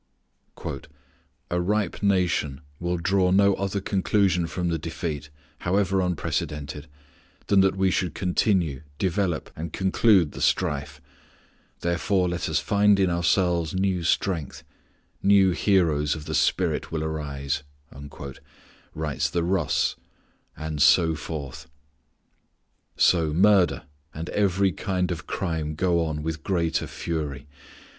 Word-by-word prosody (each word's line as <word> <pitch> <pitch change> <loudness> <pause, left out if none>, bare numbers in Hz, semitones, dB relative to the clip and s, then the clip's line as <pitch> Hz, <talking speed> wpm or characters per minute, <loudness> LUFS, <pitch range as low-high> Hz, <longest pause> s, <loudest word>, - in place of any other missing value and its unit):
"A 90 0 +1
ripe 100 0 -1
nation 90 -8 +1 0.2
will 85 +1 -1
draw 90 +2 +2
no 100 +2 +4
other 100 +1 -2
conclusion 95 -2 +1
from 90 +1 -2
the 80 -1 -1
defeat, 75 -2 -5 0.3
however 95 +1 +1
unprecedented, 75 -4 -3 0.6
than 100 -1 +4
that 95 0 +2
we 95 -1 +2
should 90 -2 -1
continue, 90 - +1 0.2
develop, 95 -3 -1
and 80 0 -5
conclude 95 -2 +3
the - - -8
strife; 70 +1 0 0.8
therefore 90 +2 +1
let 85 0 -2
us - - +1
find 100 0 +3
in 95 -2 +3
ourselves 85 -1 +1
new 95 -1 0
strength; 85 -3 -1 0.6
new 100 -2 +5
heroes 80 -6 +2
of 75 -1 -8
the - - -5
spirit - - +1
will 80 -1 -2
arise," 70 -3 -3 1.3
writes 75 -3 -1
the 85 - -1
Russ, 85 -3 +1 0.6
and 80 -1 -4
so 80 +1 +5
forth. 75 -2 -6 1.3
So 80 -4 +3
murder 95 +1 +4 0.3
and 80 +2 -5
every 100 -1 +2
kind 90 0 -2
of 85 0 -5
crime 80 -4 -2
go 85 0 +1
on 75 -2 -3
with 80 0 -3
greater 85 -2 0
fury. 75 -5 -4
85 Hz, 120 wpm, -25 LUFS, 80-95 Hz, 1.3 s, new